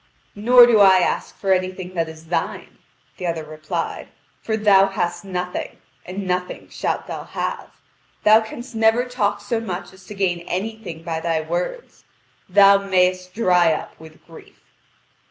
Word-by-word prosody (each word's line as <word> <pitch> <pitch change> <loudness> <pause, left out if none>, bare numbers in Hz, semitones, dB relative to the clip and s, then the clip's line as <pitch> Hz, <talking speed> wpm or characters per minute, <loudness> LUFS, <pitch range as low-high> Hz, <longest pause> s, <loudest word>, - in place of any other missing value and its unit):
"Nor 240 +4 +7
do 235 -3 +4
I 190 -2 +7
ask 180 - -1
for 195 -1 +1
anything 185 0 -3
that 165 -2 -1
is 160 0 -12
thine," 175 - -3 0.4
the 180 - -4
other 165 -2 -2
replied; 155 0 -5 0.3
"for 220 -1 -2
thou 200 -2 +5
hast 175 -2 -3
nothing, 180 -2 -5 0.3
and 190 +2 -5
nothing 180 0 -3
shalt - - -3
thou - - -6
have. - - -4 0.6
Thou 215 +1 +6
canst 240 +3 -9
never 225 +2 +3
talk 205 -5 -1
so 225 +3 -2
much 190 -6 -6
as 190 -1 -18
to 210 - -9
gain 185 -3 0
anything 190 -4 -5
by 165 -1 -3
thy 165 -1 -1
words. 175 - -5 0.5
Thou 200 +1 +6
mayest 185 -1 0
dry 180 -6 +3
up - - -6
with 160 -1 -15
grief." 165 - -16
185 Hz, 155 wpm, -21 LUFS, 175-210 Hz, 0.6 s, Nor